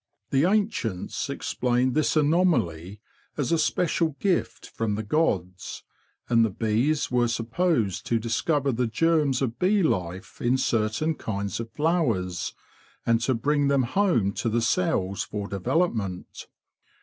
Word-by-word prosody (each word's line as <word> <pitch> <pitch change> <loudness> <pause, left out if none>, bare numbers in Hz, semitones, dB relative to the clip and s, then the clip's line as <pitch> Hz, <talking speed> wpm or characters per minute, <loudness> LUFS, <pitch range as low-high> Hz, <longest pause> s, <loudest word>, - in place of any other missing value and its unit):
The 140 +3 +3
ancients 195 - -1
explained 125 +1 0
this 155 +1 +1
anomaly 145 - +1 0.4
as 145 -1 -1
a 165 - +3
special 165 -2 +1
gift 190 -3 -1
from 110 -2 -1
the 110 - -3
gods, 95 - -1 0.4
and 115 -1 +4
the 115 - +2
bees 115 +10 0
were 120 -1 +3
supposed 115 - 0
to 115 - +2
discover 135 +6 0
the 125 0 0
germs 145 +1 +2
of 120 -2 -3
bee 195 +2 +3
life 95 - -2
in 125 +2 +2
certain 115 +5 0
kinds 100 - -4
of 115 0 -5
flowers 120 - 0 0.5
and 115 0 +2
to 125 +2 +1
bring 145 +4 +1
them 140 -2 +3
home 120 - +1
to 115 - -2
the 115 +1 0
cells 115 - 0
for 105 -1 -4
development. 105 - -2
120 Hz, 135 wpm, -26 LUFS, 105-155 Hz, 0.5 s, and